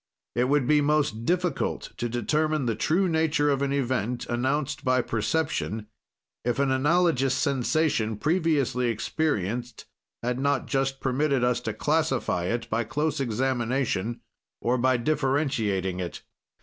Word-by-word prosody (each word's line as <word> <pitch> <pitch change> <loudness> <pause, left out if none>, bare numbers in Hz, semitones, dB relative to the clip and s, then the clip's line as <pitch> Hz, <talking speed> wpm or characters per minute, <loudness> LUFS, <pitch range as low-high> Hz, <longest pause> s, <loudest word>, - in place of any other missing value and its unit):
"It 120 +1 +2
would 140 0 +2
be 150 +3 +4
most 145 -6 +1
difficult 180 -2 -1
to 120 - -2
determine 150 +5 0
the 115 - +1
true 175 - +1
nature 160 -3 +2
of 135 -1 0
an 140 -1 0
event, 125 -3 -1
announced 135 +3 -1
by 130 -2 +2
perception, 115 -2 -1 0.6
if 120 0 0
an 140 -1 +2
analogous 135 -1 +2
sensation, 135 -5 +1
previously 150 -5 +1
experienced, 120 - -2 0.4
had 125 +1 -1
not 140 +1 +1
just 135 0 -1
permitted 135 0 +1
us 125 0 +2
to 110 -3 -4
classify 145 - 0
it 115 +4 -2
by 115 +1 0
close 150 +8 -1
examination 120 -2 -1 0.4
or 125 +1 +1
by 130 +1 +3
differentiating 120 - 0
it. 90 -3 -5
130 Hz, 135 wpm, -26 LUFS, 120-150 Hz, 0.6 s, be